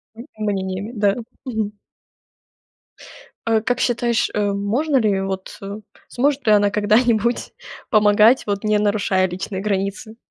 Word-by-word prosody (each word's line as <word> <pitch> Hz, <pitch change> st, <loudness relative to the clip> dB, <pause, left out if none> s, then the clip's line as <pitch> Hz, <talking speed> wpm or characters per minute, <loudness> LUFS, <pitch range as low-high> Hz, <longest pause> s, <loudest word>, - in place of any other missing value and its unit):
М, 235 Hz, +3 st, -10 dB
мнениями, 200 Hz, 0 st, -3 dB
да. 205 Hz, -3 st, +1 dB, 0.3 s
Мгм. 215 Hz, -4 st, -3 dB, 1.7 s
Э, 220 Hz, -1 st, +3 dB
как 245 Hz, +1 st, -1 dB
считаешь, 235 Hz, -1 st, +1 dB
э, 210 Hz, -, 0 dB
можно 240 Hz, +9 st, 0 dB
ли, 205 Hz, -5 st, +1 dB
вот, 190 Hz, -1 st, -5 dB, 0.5 s
сможет 275 Hz, +1 st, 0 dB
ли 215 Hz, -, +4 dB
она 205 Hz, 0 st, +4 dB
когда-нибудь 220 Hz, +3 st, +1 dB, 0.4 s
помогать, 215 Hz, +2 st, +4 dB
вот, 200 Hz, 0 st, -2 dB
не 210 Hz, 0 st, +3 dB
нарушая 205 Hz, -2 st, +1 dB
личные 190 Hz, +2 st, -5 dB
границы? 205 Hz, +2 st, -3 dB
210 Hz, 120 wpm, -20 LUFS, 200-235 Hz, 1.7 s, ли